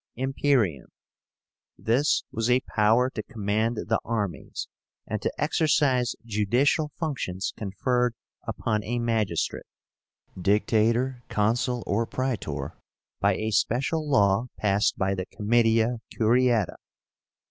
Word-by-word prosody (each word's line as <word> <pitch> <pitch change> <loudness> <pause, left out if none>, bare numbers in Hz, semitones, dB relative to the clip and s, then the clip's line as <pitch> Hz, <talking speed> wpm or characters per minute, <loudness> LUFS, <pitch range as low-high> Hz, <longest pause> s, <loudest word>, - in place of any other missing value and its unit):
IMPERIUM. 130 - +1 0.9
This 130 +7 +2
was 115 +2 -1
a 125 +1 +4
power 115 +4 +4
to 110 - -4
command 110 0 -1
the - - +2
armies, 105 -7 -3 0.4
and 110 -1 -3
to - - -1
exercise 145 -5 +2
judicial 120 +8 +1
functions 115 - -3
conferred 120 +4 0 0.3
upon 105 -2 -2
a 120 +3 -2
magistrate 110 -7 -1 0.7
(Dictator, 115 +6 +1
Consul, 120 +3 0
or 115 +3 0
Praetor) 100 - -3 0.4
by 100 0 +3
a 110 +2 -2
special 140 +8 0
law 100 -2 +3
passed 105 0 +1
by 95 0 +1
the 95 -1 -4
Comitia 115 +2 +2
Curiáta. 120 -2 +2
115 Hz, 105 wpm, -26 LUFS, 105-125 Hz, 0.9 s, a